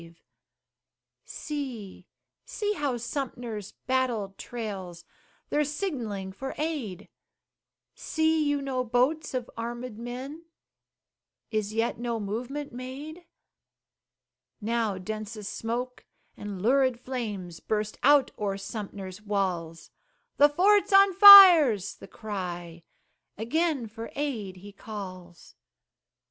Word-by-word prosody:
See, 250 - -7 0.4
see, 415 -1 -2
how 285 -9 -2
Sumter's 235 -5 -5
banner 255 -6 0
trails, 195 -8 -7 0.5
They're 300 - +2
signaling 250 - -4
for 265 +8 -7
aid, 265 - -4 0.9
See 320 0 0
you 290 -1 0
no 260 -2 -1
boats 255 +6 0
of 250 -2 -3
armed 235 0 -6
men? 260 +7 -7 1.1
Is 215 -2 -1
yet 225 0 -1
no 235 -1 -2
movement 245 +8 -5
made? 285 +7 -8 1.3
Now 225 -2 -1
densest 215 +2 -6
smoke 245 +2 -4 0.3
and 200 -2 -7
lurid 255 0 +3
flames 210 -10 -5
Burst 210 -1 -3
out 285 +1 +5
o'er 200 -2 -2
Sumter's 200 -1 -7
walls; 185 -6 -3 0.5
"The 290 +1 +6
fort's 395 +8 +3
on 395 0 +6
fire," 370 - +10
's 195 0 -7
the - - -13
cry; 175 -5 -6 0.6
Again 285 - 0
for 225 +1 -9
aid 240 -10 -3
he 200 +3 -12
calls. 185 -4 -10
235 Hz, 105 wpm, -27 LUFS, 205-285 Hz, 1.3 s, fire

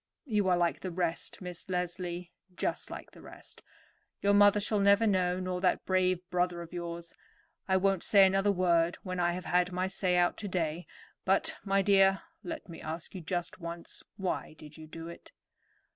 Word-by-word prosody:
You 210 -7 +1
are 180 -1 +4
like 175 -1 +1
the 185 - -4
rest, 175 0 -2
Miss 180 0 -6
Leslie; 180 -1 -3 0.2
just - - -2
like - - -8
the - - -15
rest. - - -12 0.6
Your 200 0 +3
mother 205 0 +6
shall 210 +1 0
never 200 +2 +5
know, 185 -3 +2
nor 185 -1 -3
that 185 -2 +1
brave 185 -1 +1
brother 180 -1 0
of 170 - -13
yours. 170 -1 -6 0.5
I 190 -1 +3
won't 195 -1 +2
say 200 -2 +6
another 195 +2 +3
word 175 -3 +2
when 185 -1 -4
I 175 0 +2
have 180 +1 -5
had 180 0 +2
my 180 +1 -1
say 190 -1 0
out 175 0 +2
today; 175 -4 -2 0.4
but, - - +2
my 195 -1 +2
dear, 195 -1 +4 0.2
let 320 -3 -6
me 170 - -10
ask 160 +1 -6
you 185 - -6
just 175 +4 -3
once, 170 -1 -7 0.2
why 185 -4 -3
did 150 -1 -13
you 155 -1 -11
do 165 +1 -8
it?" 170 - -11
180 Hz, 185 wpm, -31 LUFS, 170-195 Hz, 0.6 s, mother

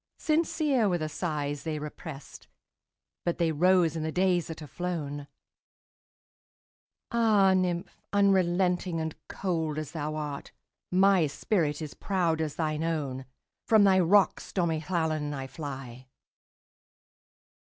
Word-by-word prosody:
Sincere 305 -7 +1
were 175 - +1
the 155 -2 -3
sighs 145 -3 -3
they 155 +1 -3
represt, 150 -1 -9 0.8
But 175 - -1
they 170 -2 +2
rose 175 0 +3
in 160 - -2
the 160 0 -2
days 180 -1 +2
that 160 -1 -7
are - - -7
flown! 145 -3 -4 1.8
Ah, 215 -5 +4
nymph! 180 -2 -1 0.2
unrelenting 185 -3 +2
and 160 -1 -3
cold 160 -5 -2
as 155 -2 -4
thou 155 -2 -3
art, 150 -2 -5 0.4
My 190 -2 +4
spirit 155 -1 -1
is 150 - -6
proud 170 -5 0
as 155 -2 -2
thine 155 -1 -1
own! 140 -6 -2 0.4
From 220 -2 +6
thy 190 -1 +5
rocks, 190 +3 +3
stormy 165 -4 0
Llannon, 155 -3 -1
I 135 -1 -4
fly. 130 -4 -8
165 Hz, 125 wpm, -28 LUFS, 150-185 Hz, 1.8 s, From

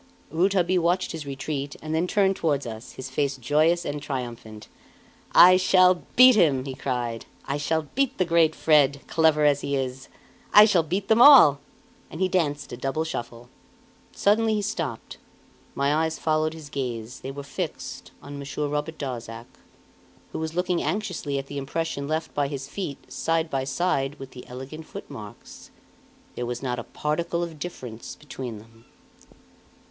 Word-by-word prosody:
Rouletabille 180 +1 +2
watched 175 +2 +1
his 155 -3 -7
retreat, 140 +1 -4
and 155 0 -5
then 165 +3 +1
turned 195 0 +2
toward 145 -6 0
us, 110 0 -8
his 130 0 -8
face 140 0 -1
joyous 155 +7 +2
and 145 0 -4
triumphant. 120 -6 -6 0.6
"I 185 +1 +8
shall 185 -1 +4
beat 255 0 +8
him!" 145 -10 +3
he 135 - -5
cried. 120 -3 -3 0.2
"I 140 - -2
shall 160 +2 0
beat 275 -1 0
the 185 - +2
great 165 -2 +3
Fred, 145 -3 +3
clever 160 -2 +3
as 145 -1 +3
he 140 - -2
is; 130 0 -4 0.5
I 210 +1 +11
shall 195 -6 +3
beat 185 +5 -3
them 225 +1 +4
all!" 245 - +9 0.5
And 160 - -9
he 190 - +2
danced 150 -6 -1
a - - -6
double 135 +5 -2
shuffle. 120 -6 -6 0.6
Suddenly 220 +2 +2
he 210 - -1
stopped. 150 - -4 0.6
My 140 +1 +1
eyes 160 +1 0
followed 155 0 0
his 155 -3 -10
gaze; 125 -4 -5
they 130 - -7
were 140 +1 -7
fixed 140 - -6
on 145 0 -8
Monsieur 140 +1 -4
Robert 150 +2 -3
Darzac, 115 -4 -6 0.9
who - - -5
was 160 0 -4
looking 180 -1 0
anxiously 180 -9 -2
at 135 - -4
the 140 0 -6
impression 140 0 -3
left 160 +1 -3
by 145 -1 0
his 140 -1 -6
feet 145 -5 -7
side 165 0 -1
by 135 -1 -1
side 135 -1 -1
with 135 -1 -10
the 125 - -11
elegant 135 +5 -9
footmarks. 105 -2 -10 0.6
There 120 - -4
was 120 +2 -5
not 125 -2 -2
a - - -5
particle 170 +6 -2
of 165 -3 -7
difference 125 -9 -7
between 130 -5 -7
them! 115 +2 -17
145 Hz, 165 wpm, -25 LUFS, 135-170 Hz, 0.9 s, I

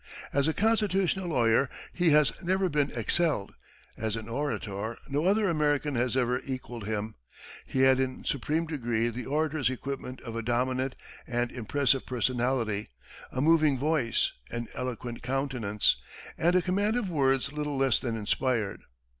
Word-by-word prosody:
As 140 +1 +2
a 160 - +2
constitutional 195 -4 +2
lawyer, 125 -3 +3 0.2
he 175 -2 +3
has 150 -1 +5
never 185 +1 +1
been 145 -2 +1
excelled; 120 - 0 0.4
as 110 0 -2
an 110 -1 -6
orator, 115 -5 -3
no 145 +4 0
other 205 +2 +3
American 150 -3 +1
has 125 +1 +1
ever 125 0 +1
equalled 125 -5 -6
him. 110 0 -2 0.5
He 130 - 0
had 130 0 +6
in 130 -1 -2
supreme 150 +5 0
degree 120 -7 0
the 120 +1 -6
orator's 150 -2 +1
equipment 130 0 -5
of 115 -2 -7
a 115 - -1
dominant 130 +3 0 0.3
and 120 -1 -1
impressive 135 +3 +1
personality, 120 -3 0 0.4
a 130 - -2
moving 155 -2 +4
voice, 140 -4 +1 0.2
an 120 0 -4
eloquent 125 -1 -4
countenance, 125 -5 +1 0.4
and 175 +2 +2
a 180 - +4
command 205 +5 +1
of 235 -5 -1
words 140 -4 +1
little 150 -1 -2
less 135 -3 +3
than 115 -3 -2
inspired. 110 0 0
130 Hz, 150 wpm, -29 LUFS, 120-150 Hz, 0.5 s, had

